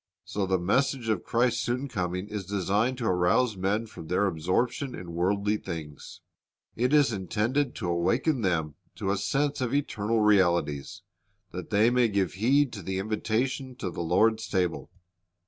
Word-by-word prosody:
So 100 -2 -2
the 95 0 +2
message 125 +6 0
of 105 -5 0
Christ's 120 0 +1
soon 125 +3 -2
coming 90 -4 -3
is 105 -3 -5
designed 100 +6 0
to 120 - -3
arouse 105 +5 +2
men 100 +4 0
from 85 -7 -11
their 90 +4 +1
absorption 100 - -1
in 85 -2 -8
worldly 100 +4 +1
things. 80 -7 -8 0.5
It 125 +3 +1
is 145 -5 +4
intended 110 +8 -1
to 100 - -4
awaken 115 - +1
them 80 -6 0 0.2
to 95 - -2
a 100 - 0
sense 135 +9 0
of 125 +1 0
eternal 115 -5 0
realities, 85 -9 +2 0.5
that 90 -2 -7
they 110 +3 +4
may 125 -1 +4
give 100 -4 0
heed 130 +7 +2
to 105 - -6
the 95 +2 -3
invitation 115 +6 -2
to 95 -7 -4
the - - -5
Lord's 110 +6 +2
table. 90 -4 -1
105 Hz, 165 wpm, -27 LUFS, 90-120 Hz, 0.5 s, is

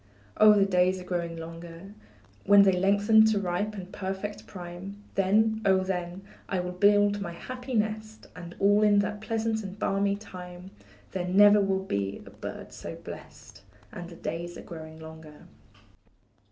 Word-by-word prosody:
Oh, 215 0 +8
the 200 -1 +4
days 185 -1 +2
are - - -8
growing 170 -2 -3
longer; 165 +3 -9 0.5
When 200 0 +8
they 195 - +5
lengthen 200 +4 +4
to 220 -2 +2
ripe 200 +3 -2
and 190 -1 -9
perfect 195 +2 -5
prime, 185 +2 -9
Then, 220 +3 +2
oh, 190 -2 +3
then, 180 0 -4 0.3
I 190 - 0
will 180 0 -3
build 205 +2 +3
my 170 -3 -5
happy 255 +6 -6
nest; 215 0 -2
And 175 -1 -9
all 205 +1 +4
in 210 -1 +5
that 210 +1 -4
pleasant 220 0 -1
and 195 -1 -8
balmy 200 -1 0
time, 180 -2 -10 0.4
There 180 -1 -3
never 205 +3 +6
will 190 -1 0
be 100 - -3
a - - -12
bird - - -8
so - - -7
blest; - - -11 0.3
And 175 -1 -8
the 170 - -11
days 170 +2 -5
are - - -9
growing 160 -1 -9
longer. 160 -1 -12
195 Hz, 165 wpm, -28 LUFS, 175-205 Hz, 0.5 s, Oh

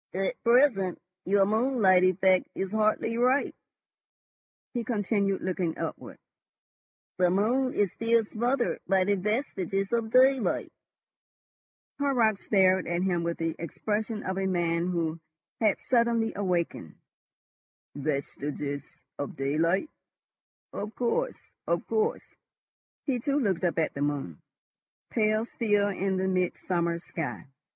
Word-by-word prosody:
"At 195 +6 -2
present 235 -7 +3 0.3
your 195 +1 +4
moonlight 215 -4 +3
effect 185 0 +3
is 190 0 -3
hardly 220 +2 +1
ripe," 255 +3 +2 1.2
he 240 -2 -2
continued, 205 -3 0
looking 180 -3 -1
upward. - - -6 1.0
"The 180 -1 +4
moon 240 +8 +1
is 200 -4 +2
still 230 0 +2
smothered 240 +4 -1
by 190 0 +3
the 205 +2 +2
vestiges 195 - -1
of 230 -1 0
daylight." 260 +1 +3 1.3
Horrocks 240 -7 +1
stared 190 -2 +3
at 175 +1 0
him 180 -3 +1
with 170 0 -2
the 165 -1 -2
expression 210 +6 -3
of 190 +1 -2
a 190 - 0
man 170 -2 0
who 165 -2 -1 0.4
has 215 -3 +2
suddenly 235 -2 +2
awakened. 175 - -2 1.0
"Vestiges 145 0 -3 0.4
of 140 - -4
daylight?.... 165 - 0 0.8
Of 210 +2 -5
course, 475 - -2 0.2
of - - 0
course." 440 +2 -1 0.7
He 260 -4 0
too 280 +4 0
looked 195 - 0
up 175 -2 +1
at 160 - +1
the 140 - -5
moon, 145 - -2 0.7
pale 215 0 +2
still 205 -4 +1
in 195 0 -1
the 190 0 0
midsummer 180 -2 0
sky. 165 -2 -5
195 Hz, 120 wpm, -28 LUFS, 175-230 Hz, 1.3 s, your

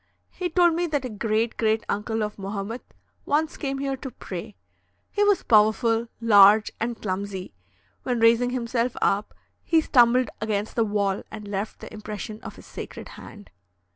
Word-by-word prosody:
He 360 -1 -3
told 345 0 +4
me 345 +1 0
that 290 -4 -1
a - - -3
great 220 +1 -1
great 220 0 +1
uncle 220 +2 -1
of 210 -1 -5
Mohamet 200 +4 -6 0.3
once 310 +3 0
came 275 -2 -3
here 275 0 -2
to 265 - -7
pray. 195 -3 -8 0.6
He 415 - +1
was 410 -2 +3
powerful, 225 +1 +3
large, 210 -1 +6
and 230 +1 -3
clumsy; 190 -1 -4 0.5
when 245 -2 -1
raising 230 +2 +4
himself 245 -1 -1
up, 200 +1 0 0.3
he 330 - +3
stumbled 250 -4 +4
against 215 -1 -2
the 230 - +2
wall 200 -2 0
and 210 -1 -8
left 200 +1 -4
the - - -9
impression 215 0 -7
of - - -9
his - - -14
sacred - - -8
hand. 95 -3 -12
225 Hz, 165 wpm, -25 LUFS, 210-255 Hz, 0.6 s, large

